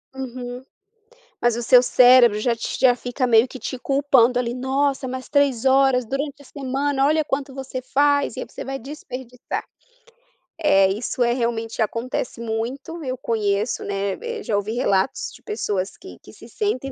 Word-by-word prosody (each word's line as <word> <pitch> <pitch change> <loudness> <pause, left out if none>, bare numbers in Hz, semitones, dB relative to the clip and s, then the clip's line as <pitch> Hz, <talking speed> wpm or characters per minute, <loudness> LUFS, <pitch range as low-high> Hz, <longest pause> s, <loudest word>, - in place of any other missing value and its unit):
Uhum. 250 -1 -6 0.8
Mas 240 -1 +2
o 240 - -3
seu 245 +1 +6
cérebro 245 -4 +6
já 235 0 +1
te - - -4
já 250 -2 +6
fica 250 +1 -2
meio 230 +1 +5
que 260 - -10
te 255 - -5
culpando 265 -3 +3
ali, 240 -1 -1
"Nossa, 270 +1 0
mas 255 0 -6
3 280 -4 +2
horas 265 -2 +4
durante 280 +2 -4
a - - -18
semana, 275 +1 -1
olha 310 +1 +2
quanto 270 -1 -3
você 265 -1 -6
faz, 285 +2 +2
e - - -4
aí - - -5
você - - -8
vai 270 0 -4
desperdiçar". 255 -2 -7 1.3
Isso, 245 +2 -4
eh, 240 0 +2
realmente 230 -2 -2
acontece 230 +2 -3
muito, 255 +9 -4
eu 255 -2 -3
conheço, 215 -2 -1
né, 200 0 -2
e 475 -1 -6
eu 425 - -9
já 210 - -1
ouvi 205 +2 -1
relatos 220 -3 0
de - - -15
pessoas 205 - -3
que 380 - -12
que - - -14
se - - -14
sentem 275 - -2
255 Hz, 175 wpm, -22 LUFS, 235-275 Hz, 1.3 s, seu